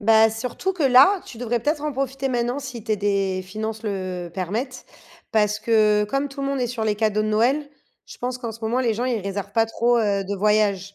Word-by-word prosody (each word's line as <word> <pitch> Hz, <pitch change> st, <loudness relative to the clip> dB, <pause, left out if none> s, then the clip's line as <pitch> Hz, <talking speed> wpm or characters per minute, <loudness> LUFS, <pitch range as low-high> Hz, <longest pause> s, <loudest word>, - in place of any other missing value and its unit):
Bah, 220 Hz, +1 st, +5 dB
surtout 250 Hz, -, -3 dB
que 345 Hz, -6 st, -2 dB
là, 275 Hz, +10 st, +6 dB
tu 230 Hz, -, -10 dB
devrais 240 Hz, -1 st, -1 dB
peut-être 295 Hz, +3 st, -1 dB
en 300 Hz, -1 st, -2 dB
profiter 270 Hz, 0 st, -2 dB
maintenant 245 Hz, +2 st, -1 dB
si 250 Hz, -5 st, -7 dB
tes 215 Hz, -2 st, 0 dB
des 195 Hz, -2 st, 0 dB
finances 215 Hz, +3 st, -5 dB
le, 185 Hz, -4 st, -3 dB
heu, -, -, -17 dB
permettent. 220 Hz, +9 st, -4 dB, 0.5 s
Parce 210 Hz, -1 st, +2 dB
que, 215 Hz, -1 st, +3 dB
comme 275 Hz, +6 st, -1 dB
tout 275 Hz, +1 st, -8 dB
le 275 Hz, -, -1 dB
monde 275 Hz, -1 st, -1 dB
est 245 Hz, -, 0 dB
sur 230 Hz, -2 st, -3 dB
les 215 Hz, -1 st, +1 dB
cadeaux 215 Hz, 0 st, +1 dB
de -, -, -1 dB
Noël, 255 Hz, +7 st, +2 dB, 0.4 s
je -, -, -11 dB
pense 250 Hz, 0 st, -3 dB
qu'en 235 Hz, -3 st, -5 dB
ce 225 Hz, -, -12 dB
moment 230 Hz, +3 st, 0 dB
les 235 Hz, -3 st, +1 dB
gens 235 Hz, +3 st, -2 dB
ils 245 Hz, -4 st, 0 dB
réservent 200 Hz, +1 st, -5 dB
pas 225 Hz, +1 st, +3 dB
trop, 235 Hz, +2 st, +2 dB
heu, 200 Hz, -3 st, +1 dB
de 200 Hz, +1 st, -3 dB
voyages. 200 Hz, -1 st, +1 dB
225 Hz, 235 wpm, -23 LUFS, 210-255 Hz, 0.5 s, là